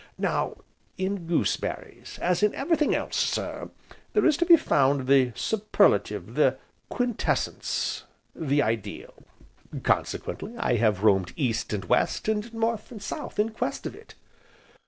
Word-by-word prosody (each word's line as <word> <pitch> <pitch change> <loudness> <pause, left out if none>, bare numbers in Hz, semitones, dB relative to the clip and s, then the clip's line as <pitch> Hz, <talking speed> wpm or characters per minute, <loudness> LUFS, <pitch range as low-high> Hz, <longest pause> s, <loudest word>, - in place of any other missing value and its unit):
"Now, - - -1 0.4
in 190 -2 -2
goose 170 - +1
berries, - - -7
as 180 +1 +2
in 210 0 +2
everything 305 +1 +1
else, - - -3
sir, - - -1 0.4
there 420 - +3
is 310 - +5
to 345 - +1
be 340 -2 +9
found 135 - +2
the 130 -2 +4
superlative, 215 -1 +1
the - - +3 0.3
quintessence, 245 -3 -1 0.3
the 145 -2 +1
ideal. 110 -2 -3 0.7
Consequently 225 - -1
I 120 - +1
have 105 -3 +1
roamed 95 -4 +3
East 120 -6 -1
and 100 -4 -3
West, - - +1
and 220 +1 -1
North 225 -1 -2
and 225 - -8
South, 205 - -6
in 210 +2 +2
quest 220 - -3
of - - -4
it." - - -15
180 Hz, 140 wpm, -26 LUFS, -, 0.7 s, be